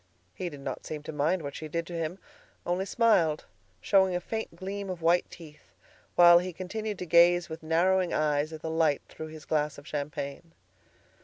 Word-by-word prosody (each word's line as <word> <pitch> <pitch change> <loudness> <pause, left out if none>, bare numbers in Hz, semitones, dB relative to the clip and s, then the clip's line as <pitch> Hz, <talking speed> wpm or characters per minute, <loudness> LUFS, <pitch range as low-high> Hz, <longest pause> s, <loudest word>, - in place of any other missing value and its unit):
He 180 - -4
did 145 -3 -10
not - - -5
seem 150 -1 -6
to - - -6
mind 155 +4 0
what 140 -1 -5
she 155 - -6
did 170 +2 -3
to 175 - -9
him, 165 +1 -3 0.5
only 180 +2 0
smiled, 190 -9 +2 0.4
showing 190 -2 +3
a - - +1
faint 220 0 -5
gleam 195 +2 -5
of 175 -3 -5
white 170 +2 +3
teeth, 155 -3 -14 0.4
while 175 0 +8
he 180 0 -5
continued 205 +4 -4
to 180 - -5
gaze 175 +1 +5
with 160 0 -7
narrowing 175 +3 +2
eyes 150 0 +1
at 160 0 -9
the 160 - -3
light 160 -3 +2
through 160 - -8
his 155 -1 -11
glass 150 -2 0
of 145 - -12
champagne. 145 +2 -5
170 Hz, 190 wpm, -28 LUFS, 155-180 Hz, 0.5 s, while